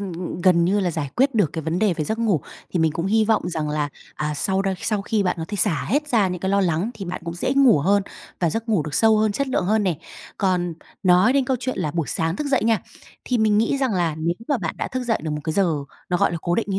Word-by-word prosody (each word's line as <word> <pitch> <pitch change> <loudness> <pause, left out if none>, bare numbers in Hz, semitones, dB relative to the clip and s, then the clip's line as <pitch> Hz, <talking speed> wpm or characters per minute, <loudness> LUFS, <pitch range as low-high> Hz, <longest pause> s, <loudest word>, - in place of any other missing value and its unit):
ừm, 195 -3 -5
ừm, 175 +1 -5
gần 170 -1 +4
như 200 +4 +2
là 180 - 0
giải 160 -3 -3
quyết 265 0 +3
được 200 -9 +2
cái 160 - -4
vấn 165 +3 -1
đề 210 -4 +2
về 155 - -2
giấc 220 +6 -2
ngủ, 210 -9 +1 0.3
thì 180 - -1
mình 160 -2 +2
cũng 170 +3 -2
hy 220 +2 +3
vọng 215 -5 +1
rằng 160 -3 -2
là, 150 -1 -1 0.3
à, 150 0 -2
sau 190 +6 0
đ - - -4 0.2
sau 210 -3 0
khi 210 0 0
bạn 180 -1 0
có 160 - -3
thể 205 - -4
xả 165 -9 +1
hết 295 +6 0
ra 215 -8 +3
những 180 -1 -4
cái 190 - -1
lo 200 0 +3
lắng, 180 +4 0
thì 200 -3 -7
bạn 180 - -5
cũng 170 0 -4
dễ 175 - -1
ngủ 265 - +6
hơn 200 +7 +2 0.4
và 170 -3 +2
giấc 225 +6 -4
ngủ 205 -8 +2
được 150 0 -6
sâu 220 -1 +4
hơn, 215 -1 +2
chất 280 +5 -1
lượng 255 - 0
hơn 215 +3 +2
nè. 180 -6 0 0.4
Còn 180 -3 0 0.3
nói 180 +5 +5
đến 275 -1 +2
câu 260 -1 0
chuyện 255 -4 -3
là 155 -5 -1
buổi 165 -2 -2
sáng 165 +2 -1
thức 300 - -3
dậy 270 -5 +1
nha, 225 -1 +2 0.4
thì 250 - 0
mình 215 -1 +3
nghĩ 230 +5 +1
rằng 260 -5 0
là, 170 -4 0
nếu 170 +2 0
mà 285 - +1
bạn 170 -6 -3
đã - - -2
thức 255 0 -3
dậy 225 -2 +1
được 155 - -3
một 150 - -3
cái 160 - -1
giờ 180 -2 +2 0.4
nó, 180 - +1
gọi - - +2
là, 170 - -2
cố 175 - 0
định 230 - 0
như 195 - 0
190 Hz, 300 wpm, -22 LUFS, 170-220 Hz, 0.4 s, ngủ